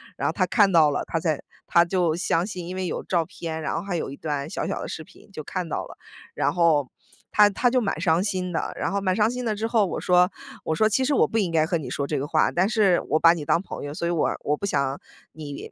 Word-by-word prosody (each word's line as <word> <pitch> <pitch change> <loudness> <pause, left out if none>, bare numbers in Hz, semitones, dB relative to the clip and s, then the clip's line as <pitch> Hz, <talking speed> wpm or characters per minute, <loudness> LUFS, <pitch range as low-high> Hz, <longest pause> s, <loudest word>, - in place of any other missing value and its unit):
然 - - -4
后 - - 0
她 - - +1
看 205 -4 +3
到 160 -4 +5
了， 145 - -1
她 165 - -2
才 155 -3 -1 0.2
她 170 - +5
就 175 -2 0
相 175 0 0
信， 180 -5 -6
因 185 - -5
为 185 -1 -2
有 - - -4
照 170 -3 0
片， 160 0 -6
然 155 - -2
后 - - -1
还 185 -1 -3
有 - - -3
一 135 - -7
段 145 -1 -4
小 - - -3
小 - - -3
的 - - -5
视 160 - -6
频， 210 - -19
就 155 - -6
看 180 +3 -4
到 - - -3
了。 - - -13 0.4
然 145 - 0
后 155 -6 +3 0.4
她 210 -1 +6
她 225 +5 +1
就 255 +1 +2
蛮 195 -8 -2
伤 170 -1 +3
心 185 -3 -2
的， 165 - -2
然 - - -2
后 200 - 0
蛮 190 -2 0
伤 215 +1 +3
心 250 0 -4
的 220 -2 0
之 215 +2 -3
后， 225 -3 +3
我 185 - -4
说， 180 0 +4 0.4
我 160 - 0
说： 215 +6 +3
“其 260 +5 +1
实 290 - +1
我 - - +4
不 225 - -2
应 200 -5 +1
该 160 -1 +3
和 170 +1 0
你 140 -6 -6
说 140 +2 -2
这 145 0 -2
个 140 - -3
话， - - +2
但 180 +3 +2
是 205 -5 +3
我 155 - +3
把 165 - +7
你 160 -4 -5
当 165 - +2
朋 - - -8
友， 145 - -5
所 170 - -4
以 - - 0
我 165 -3 +1
我 150 +1 0
不 200 - -4
想 140 -7 -1 0.3
你 145 -3 -8
175 Hz, 305 characters per minute, -24 LUFS, 155-195 Hz, 0.4 s, 把